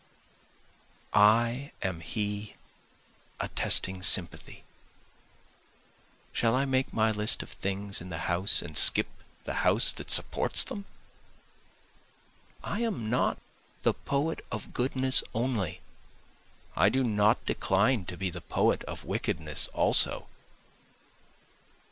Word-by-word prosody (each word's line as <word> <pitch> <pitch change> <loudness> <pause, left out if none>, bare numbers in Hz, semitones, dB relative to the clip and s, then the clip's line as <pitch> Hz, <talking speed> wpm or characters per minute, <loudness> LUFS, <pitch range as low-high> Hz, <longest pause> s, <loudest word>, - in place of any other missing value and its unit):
I 115 +6 +2
am 95 -3 -4
he 105 +5 -5 0.8
attesting 95 0 -1
sympathy, 95 -1 +1 1.7
(Shall 115 0 0
I 135 +2 0
make 130 -1 -2
my 110 0 0
list 105 0 0
of - - -15
things 100 0 -3
in 90 - -10
the 85 -1 -7
house 90 +4 +4
and 80 -3 -11
skip - - +7 0.4
the - - -6
house - - +3
that - - -9
supports - - +4
them?) 200 -1 -8 1.8
I 205 - -5
am 195 - -4
not 125 - -1 0.5
the - - +1
poet 145 +4 -4
of 110 -4 -8
goodness 130 +1 +2
only, 110 -8 -3 0.9
I 95 +4 +3
do 130 +4 -1
not 105 -2 0
decline 100 +2 -1
to 90 - -8
be 95 -2 -4
the 85 0 -9
poet - - -1
of - - -9
wickedness 80 -3 -1
also. - - +4
105 Hz, 110 wpm, -27 LUFS, 95-130 Hz, 1.8 s, skip